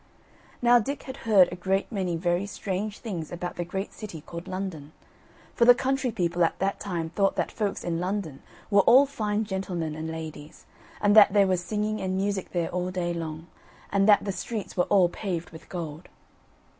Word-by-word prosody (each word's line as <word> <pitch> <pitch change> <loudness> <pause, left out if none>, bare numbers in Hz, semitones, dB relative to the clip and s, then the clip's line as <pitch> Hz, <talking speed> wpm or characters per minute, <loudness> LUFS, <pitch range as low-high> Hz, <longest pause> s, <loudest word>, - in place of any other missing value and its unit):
Now 240 0 +7
Dick 280 +6 -4
had 260 0 -8
heard 195 -4 +7
a - - -4
great 190 +4 -1
many 185 -5 -1
very 175 +3 0
strange 200 +1 -4
things 180 -9 -5
about 175 0 -5
the 175 - -2
great 190 +3 -5
city 190 -8 -8
called 170 +3 -8
London; 185 -6 -5 0.6
for 235 - +3
the 245 0 +9
country 265 0 0
people 175 -3 0
at 165 - +1
that 195 +1 -1
time 170 -5 -3
thought 195 +2 +1
that - - -1
folks 205 -3 -2
in 170 -1 -2
London 180 -6 -3 0.3
were 200 0 +6
all 260 +7 +7
fine 215 -5 -2
gentlemen 185 -5 -3
and 160 +1 -5
ladies; 160 -2 -8 0.4
and 205 0 +4
that 205 -2 +8
there 200 -1 +5
was 185 -2 0
singing 215 +2 -2
and 185 0 -1
music 195 -1 -2
there 170 -2 -1
all 180 0 -2
day 180 -2 -2
long; 160 -1 -5 0.5
and 200 +1 +3
that 205 - +6
the 200 - -1
streets 215 +2 -5
were 180 - +2
all 190 -3 +4
paved 175 -1 -4
with 160 - -13
gold. 165 -3 -6
190 Hz, 195 wpm, -27 LUFS, 170-205 Hz, 0.6 s, the